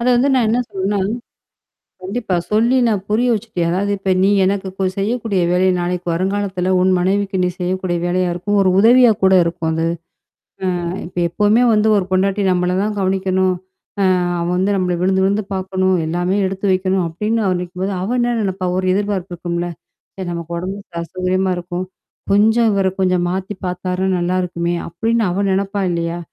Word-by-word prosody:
அத 235 - -1
வந்து 260 +4 +3
நான் 250 -3 +3
என்ன 230 +3 +2
சொல்றேன்னா 195 +1 -1 1.0
கண்டிப்பா, 195 +1 -3 0.2
சொல்லி 230 +4 +3
நான் 205 -4 0
புரிய 240 +4 +2
வச்சுட்டேன். 200 -6 -2
அதாவது 200 +3 0
"இப்ப 195 0 -2
நீ 195 - +4 0.2
எனக்கு 195 0 -1
கொ 195 - 0
செய்யக்கூடிய 220 -1 -1
வேலை 185 +1 +3
நாளைக்கு 175 0 -2
வருங்காலத்தில 190 +1 -1
உன் 185 +1 +3
மனைவிக்கு 195 +1 0
நீ - - +2
செய்யக்கூடிய 180 0 -1
வேலையா 180 0 +1
இருக்கும். 205 +4 -1
ஒரு 190 - +3
உதவியா 240 +2 +6
கூட 190 0 +5
இருக்கும் 170 -1 -2
அது. 165 +1 0 1.0
அ - - -3 0.2
இப்ப 180 - -8
எப்பவுமே 210 +6 +2
வந்து 215 0 +3
ஒரு 195 - +1
பொண்டாட்டி 195 +2 +1
நம்மள 180 0 +1
தான் 210 0 -2
கவனிக்கணும். 190 -1 +1 0.5
அ - - +3 0.4
அவள் 170 +1 -1
வந்து 190 +2 +1
நம்மள 180 -2 0
விழுந்து 190 +1 +2
விழுந்து 200 +2 +1
பாக்கணும். 190 0 0
எல்லாமே 175 +4 0
எடுத்து 190 +1 -3
வைக்கணும் 185 0 +1
அப்டின்னு 210 +7 -1
அவன் 185 -2 +1
நனைக்கும்போது 185 +2 -4
அவள் 230 +7 -1
என்ன 240 0 +1
நினைப்பா 190 -2 -2
ஒரு 185 - -1
எதிர்பார்ப்பு 200 -2 -2
இருக்கும்ல. 175 0 -3 0.5
சரி 190 -2 -5
நமக்கு 170 0 -5
உடம்பு 190 +3 -4 0.2
அசௌகரியமா 185 +2 -1
இருக்கும். 175 +1 -4 0.5
கொஞ்சம் 220 +3 +4
இவர 195 -1 +2
கொஞ்சம் 185 -1 +2
மாத்தி 190 +2 -3
பாத்தாருனா 180 +1 -2
நல்லாருக்குமே! 175 -1 -1
அப்படின்னு 225 +7 0
அவ 185 +3 -1
நினைப்பா 195 +1 -1
இல்லையா? 170 0 -2
190 Hz, 165 wpm, -18 LUFS, 180-205 Hz, 1.0 s, உதவியா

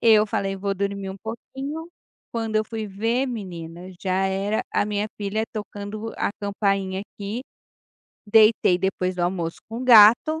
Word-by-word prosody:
Eu 220 -2 +6
falei: 195 -1 -2
"Vou 195 +1 -2
dormir 200 0 -3
um 190 - -7
pouquinho", 270 - -6 0.4
quando 225 -2 -1
eu 215 - +2
fui 220 -1 -5
ver 225 +6 0
menina, 180 -6 -7
já 190 0 +1
era 195 +3 0
a - - +2
minha 210 0 -1
filha 210 +1 -1
tocando 210 +1 -6
a - - 0
campainha 195 -1 -1
aqui. 205 +4 -6 0.8
Deitei 215 -3 +5
depois 185 -1 -1
do - - -3
almoço 175 -2 -1
com 230 +2 -5
gato, 240 +6 +7
205 Hz, 150 wpm, -24 LUFS, 195-225 Hz, 0.8 s, gato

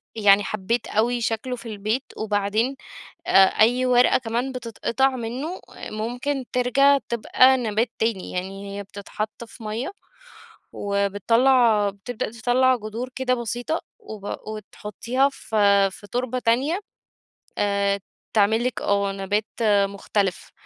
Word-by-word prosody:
يعني 205 -2 +5
حبّيت 215 +4 -2
أوي 235 +3 +1
شكله 230 +3 -2
في 240 - -12
البيت، 215 +5 -2
وبعدين 215 +4 0 0.5
آآ - - -1
أي 245 +6 +3
ورقة 250 0 +5
كمان 245 +2 -2
بتتقطع 250 +1 0
منه، 255 +9 -5 0.3
ممكن 245 +5 -3
ترجَع 275 +3 +4
تبقى 255 +3 +4
نَبات 225 0 0
تاني، 220 -4 -1
يعني 195 +2 -5
هي 200 - -4
بتتحط 210 +3 -6
في 225 +1 -14
مَيّة، 220 - -3 0.8
وبتطلّع 210 +3 +3
بتبدأ 215 +3 -5
تطلّع 250 +3 +2
جدور 225 +3 -5
كده 260 -1 0
بسيطة، 240 +7 -3 0.2
وب 210 - -7
وتحطّيها 215 +5 -2
في 200 -5 +2
في 205 +2 -13
تربة 255 +1 -2
تانية، 260 +10 +1 0.8
آآ 200 -1 +1 0.3
تعمل 220 +2 +3
لِك 250 - -2
آه 200 -1 +1
نَبات 200 +2 -1 0.4
مختلف، 200 -1 -2
225 Hz, 120 wpm, -23 LUFS, 205-250 Hz, 0.8 s, يعني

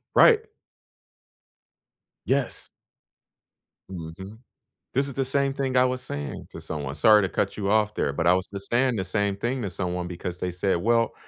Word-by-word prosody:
Right. 450 -2 +6 1.8
Yes. 135 -2 -1 1.2
Mhm. 95 +4 -8 0.5
This 135 +2 +1
is 140 - -6
the 135 +1 -1
same 135 +1 +1
thing 135 -2 -2
I 125 - +6
was 130 0 -1
saying 70 - -6
to - - -9
someone, 70 -3 -5
sorry 105 +7 +6
to 95 - 0
cut - - -1
you 100 -2 -1
off 105 0 +2
there, 70 - 0
but 75 - 0
I 90 - +7
was 90 0 0
just 100 0 -8
saying 125 +1 +2
the 95 - -1
same 100 +1 0
thing 120 +5 -2
to 100 - -2
someone 90 0 -3
because 90 0 -6
they 90 - -2
said, 90 +1 0
"Well, 115 +5 +2
100 Hz, 175 wpm, -25 LUFS, 90-125 Hz, 1.8 s, I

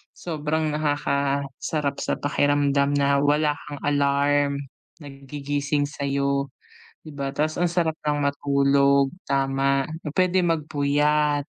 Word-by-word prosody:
sobrang 155 -1 -2
nakakasarap 140 -1 -1
sa - - -1
pakiramdam 145 -1 +2
na 140 0 +2
wala 150 +1 +2 0.2
kang 145 -1 -7
alarm 145 0 +2 0.5
na 145 - -9
gigising 140 +1 -2
sa'yo 140 -1 -1 0.6
'di 155 - -10
ba 140 -1 -5
ta's 155 +2 -1
ang 175 - +3
sarap 165 -2 -1
lang 145 -1 +1
matulog 140 -1 +2 0.2
tama, 135 0 +1 0.2
na - - -1
puwede 185 0 +3
magpuyat 150 -2 +1
145 Hz, 115 wpm, -24 LUFS, 140-150 Hz, 0.6 s, ang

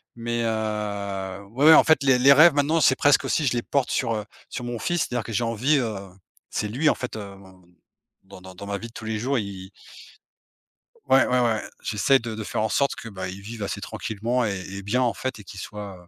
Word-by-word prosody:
Mais, 120 0 -2
heu, 100 -3 -3
ouais, 135 +6 +1
ouais 160 - +10
en - - +8
fait 160 -3 +4
les 135 -2 +4
les 135 +3 +7
rêves 155 +3 +7
maintenant 150 +3 +2
c'est 130 -1 +5
presque 145 +1 +4
aussi 155 - 0
je 125 - +2
les 120 - 0
porte 140 +2 -1
sur, 115 -3 0
heu, 105 -1 -4 0.2
sur 125 - -6
mon 120 -1 -4
fils, 175 +4 -1
c'est-à-dire 120 -2 -2
que - - -8
j'ai 115 - 0
envie, 120 +6 +1
heu 115 -5 -1 0.5
c'est 105 - -2
lui 135 +9 +1
en - - +2
fait, 125 -2 -6
heu, 100 -2 -8 0.9
dans 95 -1 -14
dans 95 +1 -10
ma 100 0 -2
vie 115 - -7
de 115 - -18
tous 110 - -9
les 110 -1 -2
jours 135 +5 0
il 105 - -3 0.2
il 95 - -16 1.4
Ouais, 130 0 +5
ouais, 125 0 +2
ouais 115 -3 +1 0.2
j'essaie 110 +6 +3
de 115 -3 -6
de 110 0 -5
faire 105 - -3
en 110 - 0
sorte 140 +4 +1
que, 115 - -9
bah, 95 -3 -6
il 95 +1 -8
vive 110 +2 -8
assez 100 - -3
tranquillement 115 +4 -2
et 100 -4 -2
et 100 0 -6
bien 105 +6 0
en 120 - +1
fait 130 -3 -4
et - - -11
qu'il 95 0 -10
soit, 100 0 -8
heu, - - -23
115 Hz, 245 wpm, -24 LUFS, 105-130 Hz, 1.4 s, ouais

